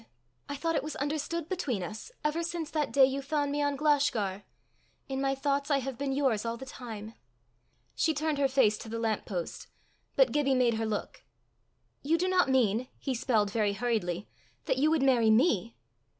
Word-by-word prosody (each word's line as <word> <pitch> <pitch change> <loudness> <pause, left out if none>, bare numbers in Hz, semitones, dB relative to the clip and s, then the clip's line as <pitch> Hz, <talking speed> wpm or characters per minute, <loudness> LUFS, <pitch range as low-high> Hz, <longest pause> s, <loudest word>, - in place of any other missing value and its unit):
I 285 - -3
thought 330 +4 -1
it - - +2
was 305 - -6
understood 305 +3 -2
between 280 - -2
us, 215 - -7
ever 300 +2 0
since 335 -2 -4
that 305 -2 -1
day 275 -1 +7
you 270 +1 -2
found 285 0 -1
me 290 +1 0
on 285 -1 +1
Glashgar. 275 -10 +1 0.6
In 270 0 -3
my 270 0 +1
thoughts 280 +1 -1
I 285 - +4
have 270 -1 -3
been 280 -1 -1
yours 265 -6 +1
all 230 0 -3
the 265 - -8
time." 225 -4 -8 0.8
She 320 -2 +1
turned 305 0 -1
her 275 - +4
face 260 -6 +3
to 225 - -8
the 230 - -3
lamp 225 -2 -1
post. 175 -4 -5 0.5
But - - +5
Gibbie 275 -2 +2
made 250 -2 +3
her 225 0 -1
look. 210 -1 -4 0.8
"You 315 +4 +2
do 365 +2 0
not 370 -5 +3
mean," 245 -2 +2
he 270 - -3
spelled 225 -4 +1
very 210 -2 +1
hurriedly, 200 -4 -1 0.4
"that 260 - 0
you 300 +3 +4
would 315 -3 +2
marry 245 -5 +4
_me? 220 - +3
270 Hz, 195 wpm, -30 LUFS, 225-295 Hz, 0.8 s, day